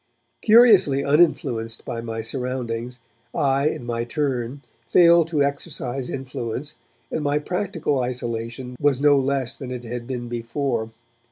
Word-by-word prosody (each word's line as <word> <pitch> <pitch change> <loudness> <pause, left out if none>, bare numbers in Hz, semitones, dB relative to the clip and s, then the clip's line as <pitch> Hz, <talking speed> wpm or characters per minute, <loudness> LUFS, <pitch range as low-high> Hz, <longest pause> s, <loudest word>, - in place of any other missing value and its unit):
Curiously 210 - +6
uninfluenced 135 -7 +1
by 115 - -4
my 115 -1 -4
surroundings, 125 0 -3 0.4
I 140 +1 +2
in 125 - -5
my 120 -1 -2
turn 135 0 -2 0.3
failed 170 -2 +6
to 155 -4 +1
exercise 140 -3 -3
influence, 130 +1 -5 0.4
and 155 - -1
my 145 0 +1
practical 165 -3 -1
isolation 125 0 -4
was 145 -3 +3
no 145 0 +5
less 135 -2 -1
than 130 - -8
it 125 -1 -5
had 120 0 -6
been 125 -2 -4
before. 120 0 -2
130 Hz, 135 wpm, -23 LUFS, 120-145 Hz, 0.4 s, Curiously